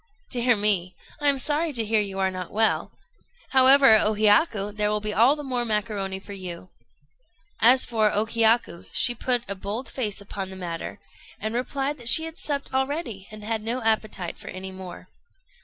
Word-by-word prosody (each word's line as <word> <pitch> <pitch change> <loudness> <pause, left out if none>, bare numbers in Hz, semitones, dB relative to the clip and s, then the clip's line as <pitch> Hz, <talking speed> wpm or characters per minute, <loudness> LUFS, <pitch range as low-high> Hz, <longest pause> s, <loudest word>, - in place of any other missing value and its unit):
"Dear 245 -1 +2
me! 200 -4 0 0.2
I 290 -1 +3
am 280 - +2
sorry 300 +5 0
to 230 -3 +2
hear 215 0 +2
you 195 -2 -5
are 190 -1 0
not 185 -1 -6
well. 220 +1 0 0.6
However, 265 -3 +7
O 215 +1 +1
Hiyaku, 210 0 +2
there 210 0 -1
will 210 0 0
be 210 0 -4
all 235 +8 +4
the 295 - -8
more 250 -3 -2
macaroni 210 -3 -3
for 200 +1 -11
you." 185 -2 -8 0.9
As 250 +4 +5
for 220 -3 +1
O 210 +2 0
Hiyaku, 225 -5 +1
she 245 - +5
put 245 0 0
a 200 - -3
bold 205 +6 -5
face 215 -6 -3
upon 195 -1 -6
the 190 - -9
matter, 175 -3 -6 0.4
and 220 +1 -4
replied 270 +4 -2
that 235 -1 0
she 320 - +7
had 325 0 -8
supped 280 -2 -3
already, 265 - -3
and 215 0 -11
had 220 0 -2
no 235 +3 -3
appetite 215 -5 -1
for - - -12
any 190 +1 -7
more. 185 -1 -10
220 Hz, 190 wpm, -24 LUFS, 200-255 Hz, 0.9 s, However